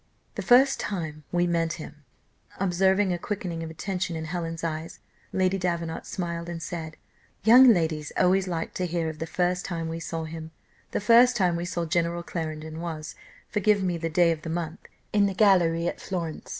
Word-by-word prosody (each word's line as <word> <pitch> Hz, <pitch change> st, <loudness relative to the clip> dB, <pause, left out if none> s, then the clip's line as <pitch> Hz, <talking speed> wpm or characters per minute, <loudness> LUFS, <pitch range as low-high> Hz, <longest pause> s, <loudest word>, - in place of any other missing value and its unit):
"The -, -, -4 dB
first 265 Hz, +2 st, +5 dB
time 160 Hz, -6 st, -4 dB
we 175 Hz, 0 st, +2 dB
met 165 Hz, -1 st, 0 dB
him," 150 Hz, -1 st, -10 dB, 0.6 s
observing 190 Hz, +1 st, +2 dB
a 175 Hz, -, -3 dB
quickening 180 Hz, -4 st, -4 dB
of 165 Hz, -, -5 dB
attention 180 Hz, +1 st, -3 dB
in 160 Hz, 0 st, -4 dB
Helen's 165 Hz, -1 st, -4 dB
eyes, 160 Hz, 0 st, -4 dB, 0.3 s
Lady 190 Hz, +1 st, +1 dB
Davenant 170 Hz, -2 st, -2 dB
smiled, 170 Hz, -2 st, -4 dB
and 170 Hz, -1 st, -5 dB
said, 160 Hz, -2 st, -6 dB, 0.5 s
"Young 245 Hz, +4 st, +9 dB
ladies 160 Hz, -6 st, 0 dB
always 185 Hz, +1 st, +3 dB
like 165 Hz, -2 st, -3 dB
to 180 Hz, -, -2 dB
hear 170 Hz, -1 st, -1 dB
of 155 Hz, -1 st, -8 dB
'the 165 Hz, -, -3 dB
first 180 Hz, +1 st, 0 dB
time 165 Hz, -3 st, -3 dB
we 165 Hz, +1 st, -4 dB
saw 165 Hz, 0 st, -4 dB
him.' 160 Hz, 0 st, -7 dB, 0.4 s
The -, -, -2 dB
first 235 Hz, +4 st, +6 dB
time 180 Hz, -6 st, +2 dB
we 170 Hz, +1 st, -3 dB
saw 175 Hz, -1 st, -2 dB
General 170 Hz, +1 st, 0 dB
Clarendon 160 Hz, -2 st, -5 dB
was 160 Hz, -2 st, -5 dB, 0.3 s
forgive 210 Hz, -1 st, +2 dB
me 180 Hz, -2 st, 0 dB
the 165 Hz, 0 st, -3 dB
day 170 Hz, +1 st, +4 dB
of 160 Hz, -1 st, -3 dB
the 165 Hz, -, -6 dB
month 165 Hz, 0 st, -3 dB, 0.3 s
in 205 Hz, -1 st, +4 dB
the 195 Hz, -, -3 dB
gallery 175 Hz, -5 st, +4 dB
at -, -, -4 dB
Florence. 170 Hz, -4 st, -4 dB
170 Hz, 190 wpm, -26 LUFS, 165-185 Hz, 0.6 s, Young